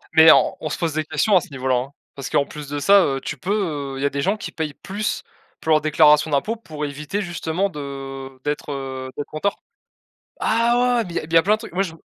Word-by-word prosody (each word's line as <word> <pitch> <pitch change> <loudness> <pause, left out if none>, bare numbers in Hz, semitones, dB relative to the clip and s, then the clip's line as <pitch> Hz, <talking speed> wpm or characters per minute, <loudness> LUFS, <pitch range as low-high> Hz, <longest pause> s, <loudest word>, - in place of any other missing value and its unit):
Mais 160 0 +9
on - - +4
on 155 - -3
se - - -3
pose 165 -3 -1
des 155 0 0
questions 155 +7 +2
à 180 - +6
ce - - -11
niveau-là, 130 -1 -1 0.3
parce 140 - -6
qu'en 140 - +2
plus 150 -2 -9
de 145 - -3
ça, 195 +6 +6
heu, 135 -1 -1
tu 150 - -5
peux, 155 -7 -2
il 135 - -4
y - - +2
a - - +3
des 140 0 -2
gens 195 +6 +1
qui - - -7
payent 155 -3 -3
plus 205 +2 -3 0.4
pour 160 - -2
leur 155 -1 +5
déclaration 150 0 +5
d'impôts, 210 +11 +1
pour 155 -9 -6
éviter 150 +8 -4
justement 175 +1 -1
de 135 -3 -7
d'être, 150 0 -3
heu, 130 -1 -5
d'être 145 - -6
en 155 - -3
tort 200 +4 0 0.9
ah 240 +2 +2
ouais, 230 - +1
mais 175 - -9
il - - -6
y - - +3
a - - -8
il 160 - -11
y - - +4
a 165 - +7
plein 210 +2 +3
de - - -2
trucs. 225 - -9
Moi, 190 - +1
je 165 -4 -7
155 Hz, 265 wpm, -22 LUFS, 140-190 Hz, 0.9 s, Mais